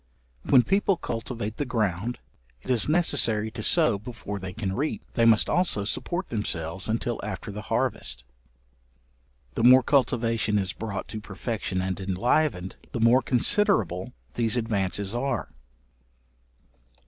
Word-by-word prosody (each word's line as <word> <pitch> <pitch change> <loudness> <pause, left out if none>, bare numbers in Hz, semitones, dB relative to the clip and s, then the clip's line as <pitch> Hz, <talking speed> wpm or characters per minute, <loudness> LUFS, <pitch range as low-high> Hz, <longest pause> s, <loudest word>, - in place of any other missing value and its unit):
When 125 -3 +5
people 195 +2 +2
cultivate 115 -5 -5
the - - 0
ground, 115 -3 -1 0.5
it - - -3
is 125 +2 +3
necessary 120 -10 +2
to 110 - -6
sow 155 - +3
before 105 -2 -7
they 95 0 -6
can 95 -1 -3
reap; 145 +8 -2
they 115 - +2
must 115 -2 +5
also 175 - +1
support 175 - -3
themselves 95 -4 -2
until 115 +1 -1
after 105 0 -5
the 105 +1 -6
harvest. - - 0 1.3
The - - -2
more 130 +1 +8
cultivation 115 -5 +1
is 95 -2 -1
brought 105 -3 -5
to 110 - -6
perfection 100 -2 -3
and 95 0 -3
enlivened, 95 - 0 0.2
the - - -2
more 115 +3 +5
considerable 120 - +1 0.2
these 115 +1 +1
advances 100 -3 0
are. 125 -1 -2
115 Hz, 135 wpm, -26 LUFS, 100-125 Hz, 1.3 s, more